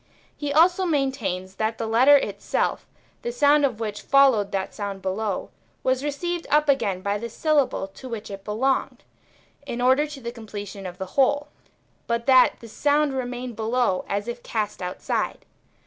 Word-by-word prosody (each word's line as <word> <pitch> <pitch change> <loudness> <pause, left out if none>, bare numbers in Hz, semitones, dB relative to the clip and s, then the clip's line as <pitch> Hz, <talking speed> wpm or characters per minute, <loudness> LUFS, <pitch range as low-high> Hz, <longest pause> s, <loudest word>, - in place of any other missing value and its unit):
He 290 -1 -3
also 350 +5 +4
maintains 245 - -1
that 220 +1 -1
the 230 - -3
letter 250 +6 +6
itself, - - -2 0.3
the 240 - -3
sound 290 +4 +4
of 250 -6 +1
which 210 -2 -4
followed 260 -8 +4
that 195 0 -2
sound 200 -2 -5
below, 195 +1 -2 0.3
was 260 +1 +1
received 335 +4 -3
up 300 +1 +3
again 215 -10 +1
by 200 +1 -1
the 235 +2 -5
syllable 290 -4 +1
to 255 +6 -11
which 220 -3 -6
it 195 0 -8
belonged, 260 +6 -1 0.6
in 245 -4 -5
order 260 +4 +3
to 295 -2 -9
the 235 -2 -5
completion 205 -4 -7
of 180 0 -9
the 190 - -4
whole, 285 +2 +2 0.6
but 235 0 -1
that 260 -2 +6
the 230 - -10
sound 290 +4 +1
remained 250 -2 -4
below 225 -3 0
as 200 +2 -2
if 240 0 -5
cast 210 -4 -3
outside. 180 0 -3
240 Hz, 165 wpm, -24 LUFS, 205-280 Hz, 0.6 s, letter